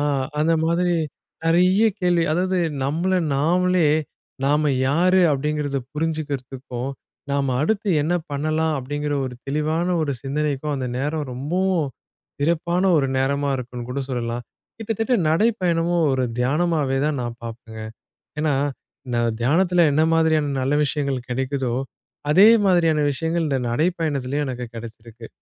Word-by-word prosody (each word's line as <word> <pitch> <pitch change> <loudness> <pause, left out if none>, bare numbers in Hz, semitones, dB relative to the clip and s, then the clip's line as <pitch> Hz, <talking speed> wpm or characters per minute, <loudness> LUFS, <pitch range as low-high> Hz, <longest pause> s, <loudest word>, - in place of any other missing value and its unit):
ஆ - - +1 0.4
அந்த 155 +2 +3
மாதிரி 175 +1 +1 0.5
நெறைய 180 +5 +4 0.2
கேள்வி. 175 -2 +2
அதாவது 185 +2 +1 0.3
நம்மள 165 +7 0 0.2
நாமளே 175 +4 +2 0.6
நாம 150 +1 +2 0.2
யாரு? 180 +6 +3
அப்பிடிங்கிறத 145 0 -1
புரிஞ்சுக்கிறதுக்கும், 140 -5 -3 0.4
நாம 140 -2 0
அடுத்து 210 +4 0
என்ன 160 +4 0 0.2
பண்ணலாம்? 155 +2 0
அப்பிடிங்கிற 145 +3 -3
ஒரு 125 - -7
தெளிவான 155 +4 0 0.2
ஒரு 145 -2 -1
சிந்தனைக்கும் 145 +1 -1
அந்த 130 -2 -3
நேரம் 150 +2 -2
ரொம்பவும் 165 +4 0 0.5
சிறப்பான 170 +3 +1 0.2
ஒரு 140 - +1
நேரமா 140 +2 0
இருக்குன்னு 125 -1 -7
கூட 140 +2 -2
சொல்லலாம். 120 -1 -3 0.3
கிட்டத்தட்ட 225 +2 0
நடைப்பயணமும் 170 -3 +2
ஒரு 130 -1 +1 0.2
தியானமாவே 145 0 +1
தான் 150 -3 -1
நான் 120 0 -5
பார்ப்பேங்க. 115 -1 -8 0.6
என்னா, 150 -3 +2 0.5
இந்த 120 -1 0 0.2
தியானத்தில 175 +7 +3
என்ன 155 - +3
மாதிரியான 160 -3 +2
நல்ல 135 +3 +1
விஷயங்கள் 140 -4 -2
கிடைக்குதோ, 130 0 -1 0.6
அதே 195 +7 +8 0.2
மாதிரியான 165 -5 +3
விஷயங்கள். 160 +3 -1
இந்த 135 -2 +1
நடைப்பயணத்திலயும் 150 -2 0
எனக்கு 125 -1 -4
கெடச்சிருக்கு! 115 0 -10
150 Hz, 125 wpm, -22 LUFS, 135-170 Hz, 0.6 s, அதே